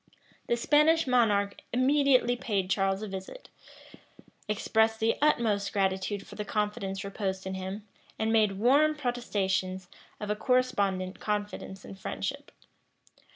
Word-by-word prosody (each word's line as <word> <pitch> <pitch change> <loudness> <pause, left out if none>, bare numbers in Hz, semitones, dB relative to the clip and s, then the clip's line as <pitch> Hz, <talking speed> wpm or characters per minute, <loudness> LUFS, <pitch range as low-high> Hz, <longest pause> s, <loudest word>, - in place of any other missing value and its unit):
The 235 - +1
Spanish 300 +6 +4
monarch 210 -6 +2
immediately 255 -1 +3
paid 200 -6 -2
Charles 195 +1 +1
a - - -4
visit, 190 - -8 1.0
expressed 220 +1 +1
the 225 +1 +2
utmost 220 -9 +2
gratitude 195 0 -1
for - - -12
the 210 - -4
confidence 205 -2 -2
reposed 195 -1 -3
in 190 - -3
him, 190 +3 -6 0.3
and 220 +1 0
made 210 -3 +3
warm 285 +8 +4
protestations 190 -8 -2 0.3
of 210 -1 -3
a - - +1
correspondent 200 -7 0
confidence 205 -2 -4
and 195 - -10
friendship. 95 - -5
210 Hz, 125 wpm, -29 LUFS, 195-240 Hz, 1.0 s, Spanish